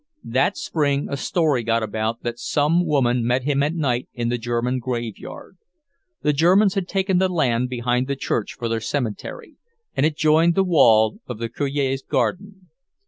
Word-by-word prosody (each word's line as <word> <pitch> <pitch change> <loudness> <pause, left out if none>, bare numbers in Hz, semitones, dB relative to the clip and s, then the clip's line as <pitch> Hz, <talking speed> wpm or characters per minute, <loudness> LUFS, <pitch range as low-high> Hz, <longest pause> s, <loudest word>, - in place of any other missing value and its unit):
That 130 - 0
spring 145 -3 -1
a - - -1
story 150 -2 0
got 115 0 0
about 110 +2 -3
that 120 0 -4
some 155 +7 +1
woman 125 -5 +2
met 125 +2 +1
him 140 0 +1
at 150 +4 0
night 130 -6 -1
in 120 -1 -2
the 120 0 -1
German 120 +2 -1
graveyard. 120 -3 -6 0.7
The 150 - +2
Germans 185 +7 +4
had 190 -3 -2
taken 190 -1 +1
the 190 0 +2
land 125 -8 0
behind 125 +1 -1
the 140 - -1
church 115 -5 -2
for 120 - -4
their 115 0 -2
cemetery, 115 -3 -4 0.4
and - - +1
it 155 0 +1
joined 160 +2 +3
the 195 - +3
wall 115 - +4
of 125 - -5
the 115 +1 -4
Cure's 135 +1 -1
garden. 185 - -3
135 Hz, 175 wpm, -22 LUFS, 120-160 Hz, 0.7 s, Germans